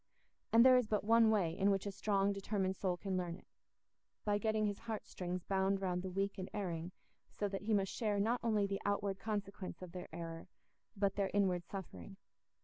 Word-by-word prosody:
And 230 +2 +7
there 255 -1 +8
is 250 -3 +2
but 210 -2 0
one 225 +1 +6
way 185 -7 +2
in 195 +1 +3
which 195 0 +1
a 200 - -2
strong 200 0 +1
determined 195 -1 -1
soul 180 -2 -1
can 190 0 -2
learn 175 -2 -2
it—by 205 +2 -7
getting 215 0 +1
his 205 -1 -2
heart 225 -2 -5
strings 180 -1 -4
bound 195 0 +1
round 180 -2 -1
the 190 - -4
weak 195 +2 -2
and 185 - -4
erring, 175 -4 -3 0.4
so 205 - -2
that 195 -1 -4
he 215 +2 0
must 195 -1 0
share 210 -4 0
not 230 +4 +2
only 215 -3 +2
the 195 0 -2
outward 200 -1 0
consequence 200 -2 -4
of 180 - -8
their 180 0 -7
error, 165 0 -6 0.5
but 195 0 +1
their 195 -1 +1
inward 180 -4 +2
suffering. 195 0 -8
195 Hz, 200 wpm, -36 LUFS, 185-210 Hz, 0.5 s, there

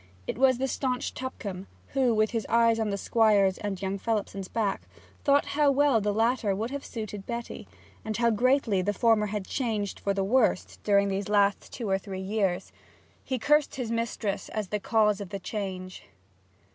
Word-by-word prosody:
It - - -4
was 260 -2 +5
the 265 +2 -1
staunch 255 -1 -2
Tupcombe, 200 -7 -6 0.2
who, 265 -3 +2
with 215 0 +2
his 225 -2 -2
eyes 230 -1 +4
on 220 -1 0
the 200 - -1
Squire's 205 -3 +3
and 200 -3 -3
young 195 +1 -3
Phelipson's 200 -3 -2
backs, 205 -3 -2 0.4
thought 285 0 +4
how 295 0 +4
well 275 -4 +3
the 205 0 0
latter 225 -1 +1
would 225 +5 -3
have 280 0 -4
suited 215 -4 -6
Betty, 235 0 -5 0.4
and 220 -1 -3
how 235 -1 +3
greatly 240 -3 +2
the 205 +3 0
former 225 -1 +3
had 205 -1 -3
changed 215 -6 -2
for 200 -1 -1
the 195 - 0
worse 225 -1 +1
during 200 -1 +3
these 195 +1 -2
last 200 -1 +2
two 235 - -5
or 195 0 +1
three 195 -1 -7
years. 190 -2 -1 0.5
He 260 - -2
cursed 295 +5 +2
his 245 -4 -3
mistress 230 -3 -2
as 215 -3 -4
the 210 - -1
cause 210 -1 +2
of 200 - -6
the 200 - -4
change. 185 -2 -6
215 Hz, 185 wpm, -28 LUFS, 200-235 Hz, 0.5 s, was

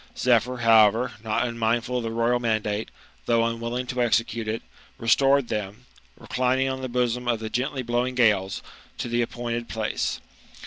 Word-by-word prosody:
Zephyr, 125 0 +2
however, 115 +1 +5
not 110 -2 0
unmindful 115 +1 0
of - - -1
the 115 - -2
royal 115 +2 +1
mandate, 110 -2 -1 0.4
though 115 -1 +3
unwilling 115 +2 -2
to 125 0 -2
execute 115 -1 +1
it, 110 +1 -3 0.3
restored 135 +3 +3
them, 105 +3 -4 0.3
reclining 130 +1 0
on 130 0 -4
the 130 - -4
bosom 125 0 -1
of 120 -2 +1
the 110 0 -6
gently 130 +2 -2
blowing 120 +2 -1
gales, 105 -6 +2 0.3
to - - -3
the 120 0 0
appointed 120 0 -3
place. 110 -1 -2
120 Hz, 155 wpm, -25 LUFS, 115-125 Hz, 0.4 s, however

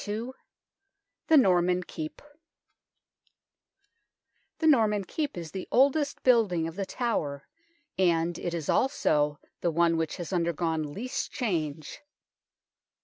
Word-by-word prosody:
II 220 +5 -3 1.0
THE 320 - +6
NORMAN 180 -6 +3
KEEP 155 -3 -7 2.3
THE 320 - -2
Norman 220 -9 +4
Keep 290 - -4
is 165 -2 -6
the 190 -2 -6
oldest 280 +2 +2
building 210 -10 +3
of 165 - -7
The 195 -1 -3
Tower, 150 - -2 0.5
and 170 -2 +2
it 170 -1 -3
is 160 -3 -4
also 150 - +1 0.2
the 175 - 0
one 165 0 +2
which 160 -1 -2
has 175 +1 -6
undergone 165 -3 -1
least 255 - -4
change. 160 - -3
180 Hz, 115 wpm, -28 LUFS, 165-235 Hz, 2.3 s, THE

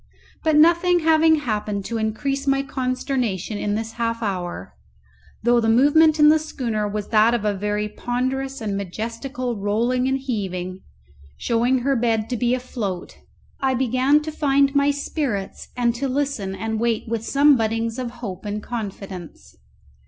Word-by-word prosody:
But 315 -1 +3
nothing 340 +3 +5
having 320 0 +5
happened 210 -5 -2
to 230 -1 -3
increase 275 +6 -2
my 275 0 +2
consternation 255 -7 -2
in 205 0 -1
this 225 +1 -3
half 230 0 -2
hour, 175 - -4 0.7
though 240 +1 +4
the 225 -1 +1
movement 295 +6 +5
in 300 0 +8
the 315 +1 +5
schooner 235 -9 -2
was 205 0 -4
that 225 +2 +4
of 220 -3 -2
a 210 - +2
very 210 +1 -2
ponderous 260 +4 -3
and 205 -2 -2
majestical 230 +6 -4
rolling 235 +5 +1
and 265 0 +1
heaving, 190 -8 -4 0.6
showing 245 +2 +1
her 275 +2 +1
bed 225 -1 0
to - - +1
be 245 +1 +1
afloat, 220 -8 -5 0.4
I 265 -1 +1
began 260 +4 +2
to 315 - -4
find 280 -2 +2
my 280 0 +3
spirits 280 -8 -3
and 240 -1 +2
to 265 +3 -2
listen 260 -8 -2
and 220 +1 -3
wait 230 -1 0
with 225 -1 -2
some 285 +4 +5
buddings 225 0 -1
of 250 -2 -3
hope 225 -6 -7
and 210 0 -4
confidence. 195 - -7
235 Hz, 160 wpm, -22 LUFS, 210-275 Hz, 0.7 s, in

